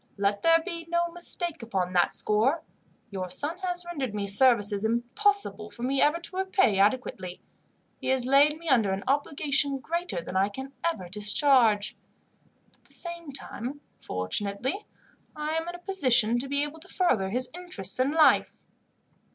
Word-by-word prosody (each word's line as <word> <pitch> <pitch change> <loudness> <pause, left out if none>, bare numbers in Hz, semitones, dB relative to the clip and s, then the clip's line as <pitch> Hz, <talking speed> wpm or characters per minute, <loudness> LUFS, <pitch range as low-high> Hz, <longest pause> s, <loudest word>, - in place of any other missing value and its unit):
"Let 200 0 0
there 330 0 +5
be 335 -3 -6
no 345 0 0
mistake 345 -2 -1
upon 190 -5 -2
that 175 -1 +3
score. 245 +10 +1 0.5
Your 185 -2 -4
son 295 - -4
has 355 -1 -2
rendered 275 -11 -4
me 205 -1 -2
services 205 -1 +3
impossible 235 - 0
for 235 - -10
me 270 +2 +1
ever 300 +3 +3
to 355 +2 -6
repay 380 - +2
adequately. 195 -4 0 0.6
He - - -6
has 260 -1 +3
laid 285 +3 +4
me 335 +1 -11
under 225 -9 +3
an 195 - -4
obligation 285 0 +1
greater 335 - -2
than 170 +2 -8
I 195 +2 +2
can 265 +6 -8
ever 215 - -2
discharge. 210 - +2 0.8
At - - -35
the - - -11
same 340 -3 -5
time, 270 +1 -6 0.2
fortunately, 200 - -3 0.5
I 300 0 -3
am 325 +1 -2
in 350 - -6
a - - -7
position 255 - +3
to 270 +2 -5
be 280 +1 +1
able 295 +2 -6
to 350 - -10
further 255 - 0
his 250 +5 -1
interests 290 - +2
in 260 +2 +2
life. 315 +1 +3
265 Hz, 165 wpm, -27 LUFS, 205-330 Hz, 0.8 s, there